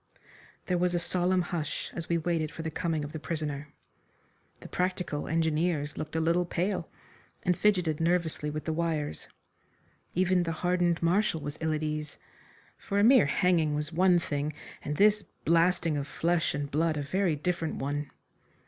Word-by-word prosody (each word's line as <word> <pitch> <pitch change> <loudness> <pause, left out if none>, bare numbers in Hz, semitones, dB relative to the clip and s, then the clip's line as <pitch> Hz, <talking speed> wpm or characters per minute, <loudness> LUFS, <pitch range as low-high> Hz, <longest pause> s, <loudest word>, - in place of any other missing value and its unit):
There 180 -1 0
was 180 0 +1
a - - +3
solemn 180 +1 +1
hush 170 -4 -3
as 165 - -5
we 170 - +2
waited 165 -2 0
for 160 - -7
the 160 - -3
coming 160 -2 -1
of 145 - -6
the 160 - -5
prisoner. 150 -2 -3 0.9
The - - -9
practical 180 -5 -2
engineers 160 -2 0
looked 155 +1 -6
a - - +2
little 170 +2 +2
pale, 180 +1 -2 0.5
and 180 - +2
fidgeted 180 -7 +2
nervously 165 -3 0
with 150 +1 -5
the 160 - -1
wires. 155 - -2 0.9
Even 185 0 +3
the 165 -1 -1
hardened 175 -1 +2
Marshal 175 0 +2
was 145 +1 -6
ill 160 0 +1
at 155 0 -1
ease, 150 -1 -3 0.6
for 200 - -3
a 205 - +4
mere 245 - +7
hanging 165 -2 +2
was 150 +2 -3
one 180 +1 +5
thing, 150 -2 -2 0.3
and 150 0 -3
this 210 0 +5 0.2
blasting 170 -1 +3
of 140 0 -3
flesh 170 -2 0
and 145 0 -3
blood 155 +1 +1
a 145 - -2
very 180 +3 +1
different 165 +1 -2
one. 145 +1 -3
165 Hz, 170 wpm, -29 LUFS, 150-180 Hz, 0.9 s, mere